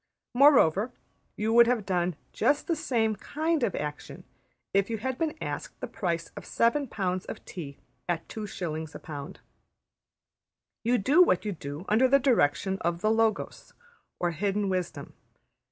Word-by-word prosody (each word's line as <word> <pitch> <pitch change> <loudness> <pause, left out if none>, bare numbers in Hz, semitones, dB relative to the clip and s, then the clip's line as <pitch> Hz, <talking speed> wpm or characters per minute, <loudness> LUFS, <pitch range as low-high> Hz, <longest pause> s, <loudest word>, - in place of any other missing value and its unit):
Moreover, 245 - +5 0.5
you 220 +2 0
would 235 0 +7
have 235 -4 +1
done 180 -3 0 0.2
just 280 +6 +2
the 335 - 0
same 235 -8 0
\textit{kind} 315 +8 -1
of 220 - 0
action 150 0 -6 0.5
if 195 +1 +2
you 225 - -1
had 260 +4 -3
been 320 -1 -1
asked - - -5
the - - -3
price 170 -4 -3
of - - -7
seven 270 +5 +1
pounds 185 -4 -2
of - - -8
tea 145 -6 -8 0.3
at 170 -1 -1
2s.\ 165 -7 -5
a - - -6
pound. 150 +2 -8 1.4
You 240 +2 +3
do 280 - +4
what 215 - +4
you 210 - -1
do 150 -1 -7
under 225 +5 +4
direction 195 - +2
of 170 0 -1
the 215 - +2
Logos 225 -2 -1 0.4
or 175 -1 +1
hidden 200 +4 -1
wisdom. 185 -2 -3
205 Hz, 155 wpm, -28 LUFS, 175-240 Hz, 1.4 s, would